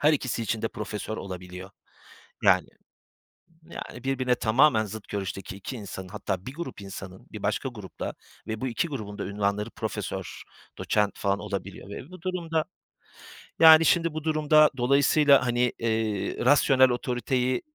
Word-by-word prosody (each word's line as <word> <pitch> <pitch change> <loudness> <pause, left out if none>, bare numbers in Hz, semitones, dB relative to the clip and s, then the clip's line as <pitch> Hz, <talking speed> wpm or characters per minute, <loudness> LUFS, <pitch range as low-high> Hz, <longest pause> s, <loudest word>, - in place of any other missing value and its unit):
her 150 +1 +5
ikisi 130 -4 -2
için 110 0 -2
de 115 - 0
profesör 105 +1 -5
olabiliyor. 90 0 -8 0.7
Yani - - +4 1.0
yani, 125 +1 -8
birbirine 130 -2 +1
tamamen 115 0 +4
zıt 110 +1 -9
görüşteki 95 -1 -5
2 125 +6 -6
insanın 95 -3 -7
hatta 95 +1 -4
bir 130 - -6
grup 170 -8 -6
insanın 95 -1 -9
bir - - -7
başka - - -1
grupla - - -7 0.3
ve 110 0 -3
bu 130 - -1
2 125 +8 -1
grubun 110 -8 -6
da - - -3
ünvanları 100 +2 -1
profesör, - - -5 0.4
doçent 105 -1 0
falan 100 0 0
olabiliyor 100 -2 -6
ve 130 - -8
bu 185 -2 -12
durumda, 170 -4 -1 1.0
yani, 160 0 +9
şimdi 170 -1 +3
bu 155 -1 -4
durumda 155 -1 +4
dolayısıyla, 140 +1 +4
hani, 120 0 +1
eee, 110 -3 -1
rasyonel 130 -2 +5
otoriteyi 125 +1 -1
120 Hz, 145 wpm, -27 LUFS, 100-140 Hz, 1.0 s, yani